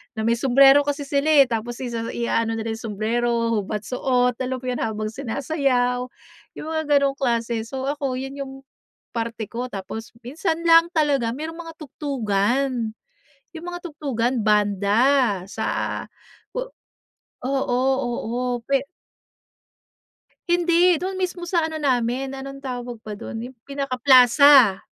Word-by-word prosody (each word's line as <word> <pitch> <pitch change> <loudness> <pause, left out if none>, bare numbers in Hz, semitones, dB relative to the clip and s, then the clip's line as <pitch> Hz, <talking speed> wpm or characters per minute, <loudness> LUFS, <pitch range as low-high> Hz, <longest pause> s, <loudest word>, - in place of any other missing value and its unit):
na 220 - -3
may 235 +1 +1
sumbrero 270 +2 +6
kasi 285 0 -1
sila, 280 +2 -1
eh. 300 -3 +7
Tapos 235 +1 -2
isa 230 -2 -4
iaano 230 -1 0
na 220 - -3
nila 225 - -4
yung 220 -3 -6
sumbrero, 230 +1 0
hubad, 205 +1 -5
suot, 250 0 0
alam 260 0 -2
'yon, 250 -1 -2
habang 215 -1 -2
sinasayaw, 250 -1 -1 0.5
yung 310 - -7
mga 315 0 -1
gano'ng 280 -1 +3
klase. 235 -3 0
So 265 +1 -5
ako, 275 -3 -3
yun 270 +2 -6
yung 270 -1 -5 0.6
parte 230 -2 -4
ko, 245 +2 -3
tapos 220 +2 -7
minsan 320 +6 -2
lang 330 0 +6
talaga 275 -6 +1
merong 320 +3 -6
mga 330 -1 -8
tugtugan. 245 -4 -1 0.6
Yung 325 +2 -8
mga 350 - -5
tugtugan, 255 -6 -2
banda 210 +2 +2
sa 220 +2 -3 1.4
o - - 0
oo, 265 -1 +1 0.4
oo, 235 +3 -2 0.3
pe 275 0 +1 1.6
Hindi, 345 0 +4
doon 380 0 -3
mismo 360 -1 -3
sa 340 -2 +1
ano 320 - -6
namin, 255 0 0
anong 275 0 -8
tawag 245 -2 -5
ba 210 -1 -7
dun, 225 +2 -6
yung 255 +1 -9
pinaka-plaza, 260 -4 +5
255 Hz, 135 wpm, -23 LUFS, 230-280 Hz, 1.6 s, eh